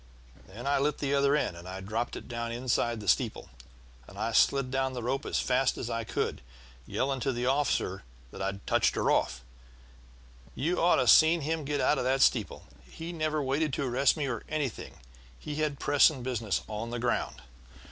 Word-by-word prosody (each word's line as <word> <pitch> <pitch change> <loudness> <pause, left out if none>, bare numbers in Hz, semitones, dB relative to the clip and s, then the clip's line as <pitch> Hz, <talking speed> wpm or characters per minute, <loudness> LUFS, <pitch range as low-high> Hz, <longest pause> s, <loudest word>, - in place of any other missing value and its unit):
Then 110 +6 -10
I 140 0 +2
lit 145 +1 0
the 140 -1 -1
other 140 0 +3
end, 150 - -1 0.3
dropped 115 +3 -2
it - - -8
down 115 -1 -4
inside 120 -1 0
the 105 - -9
steeple, - - 0 0.6
and 110 +3 -3
slid 135 0 +3
down 135 -1 0
the 125 -2 -5
rope 135 +3 -2
as - - 0
fast 130 0 +1
as 120 - -4
I 115 0 -2
could, - - -2 0.5
yelling 135 0 -1
to 135 +2 0
the 120 0 -2
officer 130 -8 0 0.3
that - - -9
I'd 100 0 -4
touched - - +2
her - - +1
off. 60 - 0 1.1
You 165 +8 0
ought 175 - +5
to 130 - +2
have 125 - +6
seen 160 +1 +6
him 155 +1 -2
get 145 0 -1
out 150 - +2
of - - -1
that 135 +2 +1
steeple! - - +1 0.2
He 165 +2 -7
never 155 -2 -1
waited 140 +2 0
to 140 - -1
arrest 130 +5 +2
me 150 - -1
or 115 -4 -3
anything; 150 -6 -3 0.4
he 150 - -6
had 150 -2 -1
pressing 145 -2 +4
business 115 -5 -2
on 110 +2 -5
the 120 - -3
ground! 120 +1 -2
130 Hz, 190 wpm, -29 LUFS, 115-145 Hz, 1.1 s, have